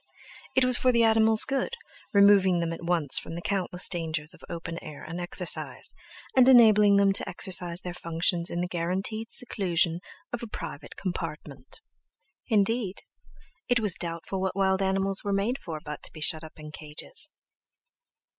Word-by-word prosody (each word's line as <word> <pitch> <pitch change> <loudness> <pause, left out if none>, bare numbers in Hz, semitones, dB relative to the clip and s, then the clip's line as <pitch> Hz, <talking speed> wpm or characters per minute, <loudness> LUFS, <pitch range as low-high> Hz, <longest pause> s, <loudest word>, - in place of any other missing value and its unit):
It 260 - +4
was 255 -1 +4
for 255 - +3
the 235 -1 +3
animals' 220 -1 +4
good, 270 - -2 0.4
removing 200 -3 +5
them 165 0 -2
at 165 - -8
once 170 -5 +3
from 165 - -9
the 170 - -5
countless 185 -2 0
dangers 160 -2 -1
of 180 - -18
open 165 -1 -6
air 150 -2 -10
and 165 +3 -6
exercise, 175 0 -1 0.4
and 260 0 +6
enabling 210 -5 +6
them 200 -1 +4
to - - -2
exercise 180 -1 -2
their 180 - -6
functions 170 0 -1
in 175 - -3
the 180 - -2
guaranteed 190 +6 -3
seclusion 175 -7 0 0.3
of 240 - -3
a 235 - -6
private - - -8
compartment! 170 - -7 0.7
Indeed, 215 -2 0 0.7
it 245 -1 +3
was 210 -5 +1
doubtful 170 +3 -4
what 190 -1 -2
wild 190 -1 +1
animals 195 0 +1
were 205 - -2
made 215 +7 -1
for 160 -3 -7
but 150 -2 -8
to - - -4
be 155 - -12
shut 155 +1 +3
up 160 - -12
in 150 0 -9
cages! 150 - -3
185 Hz, 165 wpm, -27 LUFS, 170-210 Hz, 0.7 s, and